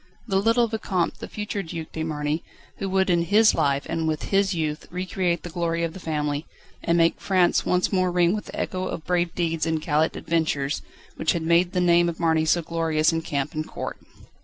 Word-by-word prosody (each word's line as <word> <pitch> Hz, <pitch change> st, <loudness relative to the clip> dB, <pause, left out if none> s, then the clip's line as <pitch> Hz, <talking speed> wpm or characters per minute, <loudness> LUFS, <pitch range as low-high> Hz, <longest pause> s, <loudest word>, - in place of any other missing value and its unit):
The 195 Hz, -2 st, +2 dB
little 230 Hz, +2 st, +3 dB
Vicomte, 205 Hz, -5 st, -1 dB
the -, -, -6 dB
future 210 Hz, -1 st, -4 dB
Duc 165 Hz, -3 st, -7 dB
de 160 Hz, -, -5 dB
Marny, 155 Hz, 0 st, -2 dB, 0.3 s
who 195 Hz, -, -3 dB
would 190 Hz, 0 st, +2 dB
in 170 Hz, -1 st, +3 dB
his 215 Hz, +5 st, +5 dB
life 140 Hz, 0 st, +1 dB
and 160 Hz, -1 st, -1 dB
with 155 Hz, -1 st, -2 dB
his 195 Hz, 0 st, +3 dB
youth 155 Hz, -2 st, -2 dB
recreate 180 Hz, -1 st, -1 dB
the 175 Hz, -, -7 dB
glory 170 Hz, -1 st, -1 dB
of 165 Hz, -1 st, -2 dB
the 190 Hz, -, -9 dB
family, 150 Hz, -3 st, -2 dB, 0.3 s
and 170 Hz, 0 st, +1 dB
make 165 Hz, 0 st, +2 dB
France 185 Hz, -3 st, +2 dB
once 180 Hz, +2 st, +1 dB
more 185 Hz, -1 st, +2 dB
ring 175 Hz, 0 st, +3 dB
with 210 Hz, -, -3 dB
the -, -, -7 dB
echo 185 Hz, 0 st, -2 dB
of 160 Hz, -, -5 dB
brave 175 Hz, -1 st, 0 dB
deeds 165 Hz, -2 st, 0 dB
and 160 Hz, -1 st, 0 dB
gallant 155 Hz, +1 st, +1 dB
adventures, 155 Hz, -4 st, -1 dB, 0.4 s
which 160 Hz, -, +1 dB
had 170 Hz, -, -2 dB
made 170 Hz, +2 st, +3 dB
the 180 Hz, -, +1 dB
name 175 Hz, 0 st, +4 dB
of 165 Hz, -, -6 dB
Marny 160 Hz, -2 st, +2 dB
so 165 Hz, +2 st, +2 dB
glorious 160 Hz, -1 st, +1 dB
in 165 Hz, -, 0 dB
camp 140 Hz, -3 st, -2 dB
and 155 Hz, 0 st, -3 dB
court. -, -, -6 dB
170 Hz, 210 wpm, -24 LUFS, 160-185 Hz, 0.4 s, his